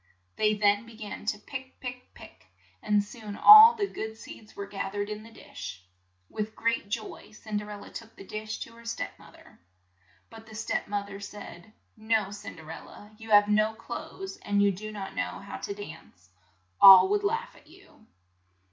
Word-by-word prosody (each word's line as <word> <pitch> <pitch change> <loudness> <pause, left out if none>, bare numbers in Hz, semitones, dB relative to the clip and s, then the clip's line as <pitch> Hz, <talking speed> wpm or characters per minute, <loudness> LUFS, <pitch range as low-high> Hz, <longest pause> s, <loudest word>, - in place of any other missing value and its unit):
They 215 0 +2
then 205 +1 +2
be 230 - -13
gan, 215 -1 -8 0.2
pick, 260 -1 -8
pick, 250 0 -8
pick, - - -15 0.3
and 210 -1 +2
soon 210 -1 -9
all 435 - +10
the 420 -3 0
good 220 - -6
seeds 215 -1 -13
were 200 - -5
gath 195 -1 -5
ered 205 0 -3
in 210 0 -5
the 225 - -13
dish. 90 - -10 0.4
With 215 0 -5
great 230 -3 -1
joy 215 0 -6
Cin 215 0 -5
der 210 0 -5
el 205 -1 -8
la - - -11
took 225 0 -10
the - - -12
dish 215 +2 -5
to 230 - -7
her 230 0 -15
step 230 - -4
moth - - -16
er. - - -19 0.7
But 225 0 -13
the 220 - -12
step 215 - -2
moth 200 0 -3
er 195 - -8
said, 200 -1 -10 0.2
"No 220 -2 0
Cin 205 +1 -8
der 160 -1 -11
el - - -9
la, 205 - -14
you 225 0 -11
have 205 -1 +6
no 215 +1 +2
clothes 385 +11 -7
and 205 0 -1
you 200 - +4
do 215 +3 -7
not 200 -2 -7
know - - -3
how 200 - -8
to 200 - -5
dance. 155 - -12 0.5
All 195 - +11
would 410 0 +1
laugh 455 +4 -2
at - - -20
you." 220 - -20
215 Hz, 200 wpm, -28 LUFS, 205-225 Hz, 0.7 s, All